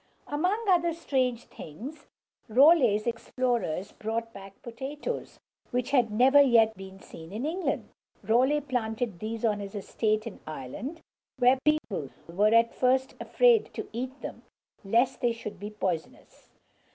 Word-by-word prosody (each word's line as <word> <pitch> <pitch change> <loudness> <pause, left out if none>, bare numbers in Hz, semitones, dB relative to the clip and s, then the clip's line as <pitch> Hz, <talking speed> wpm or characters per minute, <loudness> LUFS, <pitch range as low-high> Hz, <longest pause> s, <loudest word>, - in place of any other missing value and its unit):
Among 365 +10 -1
other 345 -3 +3
strange 255 -7 -1
things, 235 - -10 0.4
Raleigh's 250 -4 +5
explorers 235 -6 -2
brought 230 +1 -4
back 195 0 -12
potatoes, 270 - -6 0.3
which 250 +2 -2
had 250 -5 +3
never 260 +7 +6
yet 230 -5 +4
been 195 0 -11
seen 165 -3 -12
in 220 +7 -4
England. 340 +3 -2 0.3
Raleigh 255 +8 +3
planted 235 -6 -3
these 225 +1 -3
on 210 -2 +1
his 200 0 -7
estate 215 +1 -1
in 230 - -8
Ireland, 155 - -6 0.4
where 255 +1 +4
people 235 - 0 0.2
were 200 +6 +2
at 230 0 +4
first 260 +1 +1
afraid 475 -3 +3
to - - -5
eat 255 +4 -5
them, - - -7 0.4
lest 235 +6 +1
they 240 -1 +2
should 210 -4 -8
be 205 +2 -5
poisonous. 185 -6 -5
235 Hz, 140 wpm, -28 LUFS, 210-270 Hz, 0.4 s, never